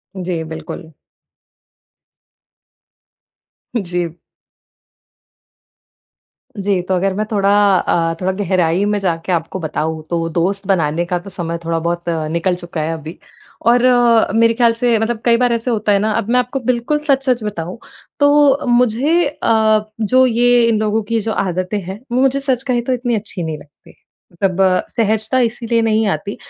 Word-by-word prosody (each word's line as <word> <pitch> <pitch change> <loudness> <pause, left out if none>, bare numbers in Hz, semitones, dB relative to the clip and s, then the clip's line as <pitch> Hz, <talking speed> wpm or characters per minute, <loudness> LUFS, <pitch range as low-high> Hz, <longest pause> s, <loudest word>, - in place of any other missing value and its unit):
जी, 180 -3 -3
बिल्कुल। 160 +1 -8 2.9
जी। 175 -5 -2 2.4
जी, 195 -2 0
तो 185 +1 -3
अगर 190 +1 0
मैं 210 +3 -2
थोड़ा 200 -1 +1 0.3
अ, 165 -1 0
थोड़ा, 185 +1 +1
गहराई 185 -1 0
में 210 0 0
जाके 175 -1 -2
आपको 170 +2 -2
बताऊँ, 160 -1 -3
तो 165 -1 -1
दोस्त 190 +4 -1
बनाने 170 -3 +1
का 175 0 -2
तो 190 +3 -11
समय 170 -3 -4
थोड़ा 165 0 0
बहुत 170 +1 -2 0.3
निकल 175 +2 0
चुका 175 -2 -5
है 160 +1 -2
अभी। 160 +1 -8 0.5
और 240 +1 +4
अ, 240 -2 +4
मेरे 230 +1 +4
ख्याल 235 -1 +3
से 235 0 +1
मतलब 225 0 -2
कई 235 -1 +4
बार 245 -1 +2
ऐसे 235 +2 -1
होता 215 -2 0
है 200 - +4
ना 215 +1 0
अब 205 - -3
मैं 250 +1 +3
आपको 250 +2 -2
बिल्कुल 250 +4 0
सच-सच 265 -4 +1
बताऊँ, 180 -3 -5 0.4
तो 285 -1 +4
मुझे 250 +8 +2
अ, 220 -6 +2 0.2
जो 255 +5 +4
ये 245 0 +3
इन 220 -2 +2
लोगों 215 +1 0
की 225 +2 -1
जो 220 +1 -2
आदतें 185 +2 -2
हैं, 190 +3 -7
वो 250 - +1
मुझे 270 +1 +2
सच 265 -3 -1
कहे 240 -1 +1
तो 255 +2 -1
इतनी 245 -1 -1
अच्छी 205 -4 -5
नहीं 160 -1 -4
लगती। 145 0 -19 0.4
मतलब 185 +1 -1
अ, 185 -1 +3
सहजता 220 +2 0
इसीलिए 230 0 -1
नहीं 220 -1 +1
आती, 205 - -7
210 Hz, 160 wpm, -17 LUFS, 175-240 Hz, 2.9 s, और